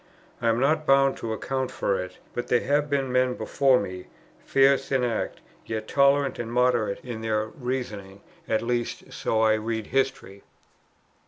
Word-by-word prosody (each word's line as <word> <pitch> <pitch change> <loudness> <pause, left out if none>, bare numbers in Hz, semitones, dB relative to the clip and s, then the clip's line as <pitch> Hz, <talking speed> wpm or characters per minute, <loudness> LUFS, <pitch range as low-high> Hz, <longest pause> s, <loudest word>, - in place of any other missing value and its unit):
I 115 - 0
am 115 +1 +2
not 155 +3 +1
bound 135 0 +4
to 115 - -4
account 130 +3 -2
for 95 - -1
it; 90 0 -11 0.2
but 120 0 -4
there 125 - +2
have 145 +2 +1
been 135 -2 0
men 125 0 +2
before 135 -2 +2
me, 95 -2 -6 0.4
fierce 135 0 +3
in 130 -2 +2
act, 115 -3 -2 0.3
yet 110 -1 -4
tolerant 140 0 +3
and 115 -1 -4
moderate 120 -4 +1
in 120 -3 -5
their 110 -1 0
reasonings; 110 -7 -5 0.3
at 110 - +1
least, 120 0 -3
so 110 - 0
I 110 -1 +4
read 110 0 -2
history. 130 -7 -2
125 Hz, 165 wpm, -26 LUFS, 110-135 Hz, 0.4 s, bound